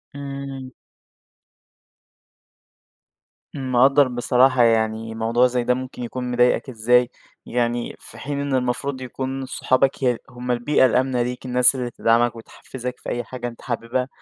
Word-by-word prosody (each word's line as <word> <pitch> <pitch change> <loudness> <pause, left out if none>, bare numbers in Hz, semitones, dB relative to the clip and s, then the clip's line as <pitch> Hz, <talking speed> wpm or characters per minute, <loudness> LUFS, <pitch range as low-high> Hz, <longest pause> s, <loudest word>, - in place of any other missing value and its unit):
إمم. 140 -2 -7 2.8
مقدّر 135 +1 +4
بصراحة، 125 +1 +3
يعني 110 -1 +1
موضوع 115 +3 +2
زي 125 -1 -1
ده 125 - +2
ممكن 130 0 -6
يكون 125 +1 -4
مضايقك 125 +2 +2
إزاي 120 +1 +3 0.4
يعني 120 0 -1
في - - -13
حين 140 0 -4
إن 140 -1 -1
المفروض 130 +2 -2
يكون 130 +1 -4
صحابك 130 +1 +1
ي 125 -2 +2
هم 125 0 -5
البيئة 125 +3 +3
الآمنة 130 0 +1
ليك، 125 +1 -4
الناس 125 +1 +4
اللي 125 -2 -3
تدعمك 115 +1 +2
وتحفزك 125 +2 -8
في - - -7
أي 120 - -2
حاجة 120 0 -6
أنت 120 -1 -10
حاببها، 120 +1 -2
125 Hz, 135 wpm, -22 LUFS, 120-130 Hz, 2.8 s, مقدّر